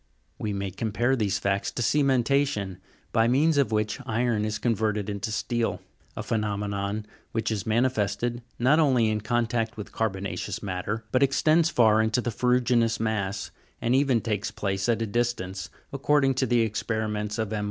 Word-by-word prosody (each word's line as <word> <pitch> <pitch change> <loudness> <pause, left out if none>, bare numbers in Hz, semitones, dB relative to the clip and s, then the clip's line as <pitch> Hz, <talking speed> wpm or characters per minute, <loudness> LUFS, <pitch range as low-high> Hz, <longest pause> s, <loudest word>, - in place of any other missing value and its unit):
We 105 - -2
may 100 -1 -3
compare 115 +6 0
these 105 -6 0
facts 100 0 0
to 120 - -2
ctmenta'tion, 135 -6 +1 0.3
by 115 0 +3
means 145 +5 +3
of 140 - +2
which 110 -1 0
iron 115 -1 +1
is 105 0 -2
converted 105 -3 0
into 105 +2 -4
steel; 120 +1 -1 0.4
a - - -3
phenomenon 105 -1 -2 0.3
which 115 0 -1
is 105 -2 -3
manifested 120 0 0 0.2
not 135 +6 +4
only 130 -7 +3
in 105 0 -1
contact 115 0 -1
with 105 - -7
carbona'ceous 100 -3 -3
matter, 100 +4 -3
but 130 - +2
extends 155 +4 +3
far 110 -7 +4
into 110 +2 +1
the 120 -1 -2
ferru'ginous 125 -1 +2
mass, 105 -3 -2 0.3
and 120 - +1
even 130 -3 +3
takes 105 -2 -2
place 100 -1 -2
at 115 -1 +2
a - - 0
distance, 100 -5 -2 0.2
according 140 0 +2
to 130 0 0
the 120 0 +3
experiments 105 -1 -2
of 110 -1 -2
M. 105 - -1
110 Hz, 165 wpm, -26 LUFS, 105-125 Hz, 0.4 s, not